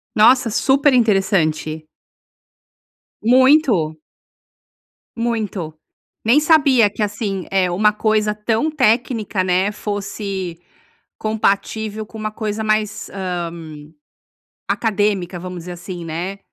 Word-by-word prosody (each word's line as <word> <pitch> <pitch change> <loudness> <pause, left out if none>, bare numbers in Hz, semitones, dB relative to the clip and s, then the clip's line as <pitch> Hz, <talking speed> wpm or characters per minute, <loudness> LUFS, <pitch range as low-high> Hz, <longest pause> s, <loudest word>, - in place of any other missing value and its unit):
Nossa, 235 +3 +5
super 275 +5 +3
interessante! 175 -9 +1 1.3
Muito! 245 - +4 1.2
Muito. 215 -8 -3 0.5
Nem 240 +6 +5
sabia 280 -8 +4
que 205 - -7
assim, 200 -3 -2
eh, 185 -2 +2
uma 210 +4 +3
coisa 215 0 +1
tão 225 +7 0
técnica, 230 -7 +1
né, 185 +2 +1
fosse 200 -4 -5 0.6
compativel 215 0 -1
com 220 - -12
uma 215 0 -3
coisa 215 0 -3
mais, 215 -1 -1
hã, 180 -3 -3 1.2
acadêmica, 205 -5 0
vamos 180 0 -7
dizer 180 +2 -7
assim, 175 0 -8
né. 175 +5 -4
210 Hz, 100 wpm, -19 LUFS, 185-225 Hz, 1.3 s, Nossa